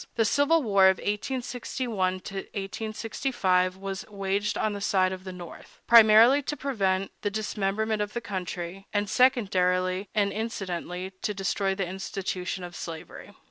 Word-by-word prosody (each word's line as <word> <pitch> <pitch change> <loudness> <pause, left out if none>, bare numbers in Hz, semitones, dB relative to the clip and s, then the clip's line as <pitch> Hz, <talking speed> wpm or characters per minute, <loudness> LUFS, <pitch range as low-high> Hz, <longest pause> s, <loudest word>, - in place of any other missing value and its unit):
The 225 - +2
civil 285 +7 +3
war 200 -4 +5
of 190 - +2
1861 220 -3 -2 0.7
65 190 -6 0
was 195 -1 -5
waged, 200 0 -1
on 215 - 0
the 200 - -5
side 185 -2 +2
of 185 0 -9
the 185 - -5
North, 175 -2 -11
primarily, 230 +4 +7
to 295 +2 -4
prevent 195 -8 0
the 205 - 0
dismemberment 215 +1 -1
of 210 0 -3
the 235 - -2
country, 185 -3 -5
and, 205 0 0
secondarily 185 -5 +2
and 200 -2 +2
incidentally, 190 -4 -4
to 210 - -2
destroy 195 0 0
the 195 -1 -1
institution 185 0 -4
of 175 -1 -8
slavery. 160 -2 -8
195 Hz, 140 wpm, -27 LUFS, 185-220 Hz, 0.7 s, primarily